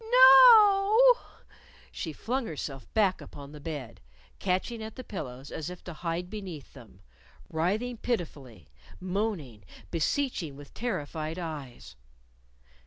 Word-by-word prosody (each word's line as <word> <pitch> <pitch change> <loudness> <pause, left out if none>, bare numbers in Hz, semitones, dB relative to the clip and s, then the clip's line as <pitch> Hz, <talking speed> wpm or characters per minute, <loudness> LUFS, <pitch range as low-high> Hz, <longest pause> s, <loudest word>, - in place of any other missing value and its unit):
"No 445 - -11
o - - +8
o!" - - -22 0.5
She 160 - -5
flung 240 - -3
herself 140 -3 -7
back 200 -4 +2
upon 140 -1 -11
the 150 - -10
bed, 145 -6 -7 0.4
catching 195 +5 -1
at 220 0 -7
the 255 - -8
pillows 135 - -7
as 160 +1 -5
if 180 0 -10
to 175 - -8
hide 170 +2 -4
beneath 185 -8 -8
them, 115 -8 -15 0.5
writhing 210 +10 -1
pitifully, 145 - -5 0.3
moaning, 180 - -3 0.3
beseeching 170 - -1
with 145 0 -13
terrified 160 -7 -4
eyes. 145 - -7
180 Hz, 125 wpm, -28 LUFS, 145-235 Hz, 0.5 s, o